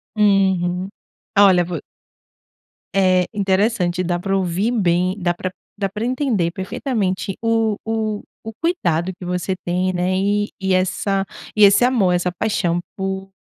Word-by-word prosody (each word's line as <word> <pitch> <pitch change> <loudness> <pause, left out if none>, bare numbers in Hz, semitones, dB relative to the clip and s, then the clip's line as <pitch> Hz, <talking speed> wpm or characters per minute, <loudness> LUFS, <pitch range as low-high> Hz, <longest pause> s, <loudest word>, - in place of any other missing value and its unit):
Uhum, 190 -3 +2 0.5
olha, 190 -3 +6
vo 170 -3 -5 1.1
Eh, 185 -1 +4
interessante, 190 -2 +1
dá 175 0 -1
para 195 +2 -1
ouvir 190 +4 0
bem, 185 -4 +1
dá 175 -3 0
pra 185 +1 -4 0.3
dá 200 -1 0
pra 215 +3 -4
entender 245 - 0
perfeitamente 195 0 -2
o 225 -2 +1
o 220 -2 -2 0.2
o 225 - -6
cuidado 190 - 0
que - - -9
você 180 +1 -2
tem, 180 +1 0
né? 180 +1 0
E 205 +2 +1
e 190 -1 0
essa 195 +1 0 0.3
e 215 - +5
esse 200 +4 +6
amor, 225 -8 +3
essa 180 0 0
paixão 175 -2 0 0.2
por 190 0 -3
190 Hz, 145 wpm, -20 LUFS, 180-210 Hz, 1.1 s, olha